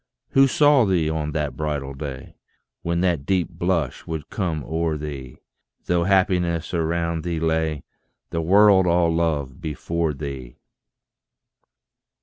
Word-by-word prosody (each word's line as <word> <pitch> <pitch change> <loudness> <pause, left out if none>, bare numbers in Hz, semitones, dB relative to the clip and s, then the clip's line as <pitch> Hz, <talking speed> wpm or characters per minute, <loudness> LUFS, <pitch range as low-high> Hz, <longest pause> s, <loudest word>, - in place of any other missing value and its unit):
Who 135 0 +5
saw 145 -1 +4
thee 85 -5 +1
on 75 -1 -2
that 75 -2 -2
bridal 75 -3 -3
day, 70 -2 -7 0.5
When 85 0 -1
that 85 -6 +1
deep 90 +2 0
blush 85 -5 -2
would 80 -3 -5
come 85 -7 -2
o'er 80 0 -1
thee, 70 -4 -7 0.5
Though 85 -1 +1
happiness 90 -4 +1
around 85 -1 -1
thee 85 -2 -2
lay, 80 -3 0 0.5
The 85 - -1
world 95 +2 +5
all 85 -1 +3
love 80 -2 -1
before 80 0 -2
thee. 70 -4 -7
80 Hz, 130 wpm, -23 LUFS, 75-90 Hz, 0.5 s, Who